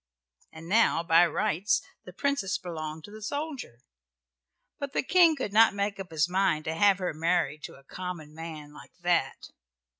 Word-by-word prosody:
And 160 +1 -11
now 205 -4 +3
by 170 +1 +5
rights 205 +3 0 0.3
the 180 - -9
Princess 205 -3 -1
belonged 160 -4 -6
to 205 - -11
the 215 +1 -11
soldier, 280 - -5 1.0
but 280 -1 -5
the - - 0
King 335 +1 +5
could 255 -8 -4
not 220 -1 +6
make 200 0 -2
up 190 -1 -7
his 160 -1 +1
mind 180 -4 +1
to 160 - -2
have 195 +3 +4
her 185 -3 -3
married 165 -1 0
to - - -10
a 135 - -18
common 170 -1 -7
man 155 -2 -8
like 150 - -14
that. 175 -6 -1
180 Hz, 175 wpm, -28 LUFS, 160-210 Hz, 1.0 s, not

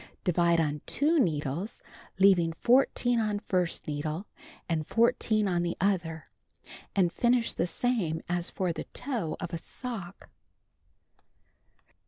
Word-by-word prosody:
Divide 170 -2 +3
on 150 -2 0
2 310 +3 +2
needles, 160 - -1 0.4
having 180 -4 +5
14 245 +3 +3
on 215 -2 0
first 180 -4 0
needle 155 +5 -3 0.4
and 160 -3 -1
14 220 -2 +2
on 175 -2 +1
the 175 0 -2
other, 175 -5 0 0.7
and 180 -4 +2
finish 240 +2 +2
the 170 - 0
same 190 -8 -1
as 175 0 -1
for 180 -3 -1
the - - -5
toe 230 - -2
of 175 -1 -6
a 165 - -2
sock. 205 -4 -8
180 Hz, 125 wpm, -29 LUFS, 165-225 Hz, 0.7 s, having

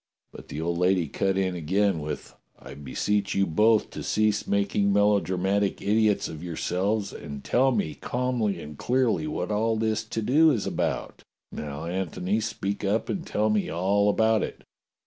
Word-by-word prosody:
But - - -12
the 75 - -6
old 85 +1 -1
lady 90 -2 +2
cut 95 +6 0
in 95 -1 +1
again 95 +2 +1
with: 75 +1 -6 0.2
"I - - -11
beseech 100 +9 -1
you 100 - +3
both 105 +6 +3
to - - -6
cease 110 -1 +1
making 100 0 +1
melodramatic 100 -1 +2
idiots 105 0 +2
of 80 0 -8
yourselves 95 +5 -1
and 70 -3 -8
tell 130 +2 +3
me 100 -10 -1
calmly 120 -6 -1
and 75 -2 -9
clearly 130 +3 +1
what 150 - -3
all 110 +2 +1
this 110 0 0
to 110 0 -3
do 155 +8 +5
is 120 -9 0
about. - - -2 0.3
Now, 75 +1 -6
Antony, 95 +3 -1
speak 105 -3 -3
up 105 +3 0
and 180 -3 -3
tell 105 +1 +1
me 105 -1 0
all 100 +4 +2
about 110 +1 +3
it. - - -5
100 Hz, 165 wpm, -26 LUFS, 90-110 Hz, 0.3 s, do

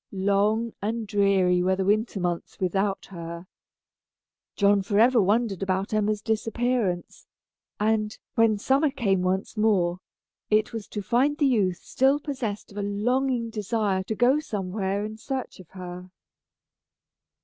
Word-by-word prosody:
Long 205 +4 +1
and 220 +2 -2
dreary 195 -4 +2
were 190 +1 +2
the 190 0 -1
winter 215 +1 +1
months 175 -2 -3
without 195 +2 0
her. 170 -1 -7 1.1
John 200 -1 +4
forever 225 +5 +4
wondered 205 0 +1
about 190 +1 -1
Emma's 215 -1 0
disappearance; 225 -4 -1 0.5
and, 215 0 0 0.2
when 225 -2 +3
summer 270 +8 +2
came 210 -9 0
once 185 +4 -1
more, 190 -5 +2 0.5
it 215 +2 +2
was 225 -3 -5
to 210 - -5
find 260 +8 +2
the 295 - +2
youth 200 -9 +1
still 270 +2 +2
possessed 255 -10 -4
of 205 - -7
a - - -1
longing 230 +4 0
desire 210 -2 -1
to 220 - -3
go 250 +6 +4
somewhere 200 -4 -2
in 215 0 -7
search 260 -1 -5
of 180 - -14
her. 180 -1 -8
210 Hz, 140 wpm, -26 LUFS, 190-230 Hz, 1.1 s, John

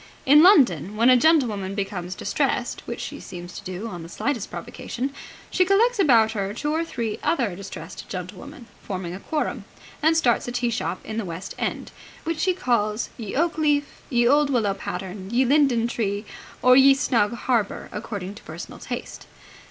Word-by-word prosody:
In 290 +3 +8
London, 225 - +5
when 230 +4 +5
a - - +8
gentlewoman 235 - +2
becomes 190 -3 -4
distressed - - -1
which - - -5
she - - -6
seems 175 0 -9
to - - -13
do 185 +4 -5
on 175 -6 -7
the 165 - -9
slightest 245 +1 -2
provocation 245 +2 -5 0.4
she 370 - +4
collects 425 +5 +3
about 230 - +5
her 200 -2 -3
two 295 +5 -2
or 325 +1 +1
three 230 -9 -4
other 235 - 0
distressed 190 -3 -9
gentlewomen, 235 - -7 0.2
forming 185 -3 -5
a 185 - -6
quorum, 305 +8 -2 0.4
and 320 +1 +4
starts 245 -7 +2
a - - -3
tea 240 -1 0
shop 230 - -3
in 220 - -5
the 225 - -1
West 180 +1 -6
End, - - -3 0.3
which 330 -1 -2
she 370 -1 +2
calls 230 - 0
Ye 220 -4 -6
Oak 330 +2 +1
Leaf, 290 -2 0
Ye 240 -2 +3
Olde 290 +2 +4
Willow 225 -7 +1
Pattern, 190 0 -6
Ye 245 +4 +2
Linden 265 -4 +3
Tree, 205 -3 -2 0.4
or 255 0 +7
Ye 270 +1 +7
Snug 235 -6 +1
Harbour, 235 -4 -1
according 205 -3 -5
to 210 - -13
personal 160 +2 -9
taste. 245 0 -7
235 Hz, 180 wpm, -24 LUFS, 195-280 Hz, 0.4 s, In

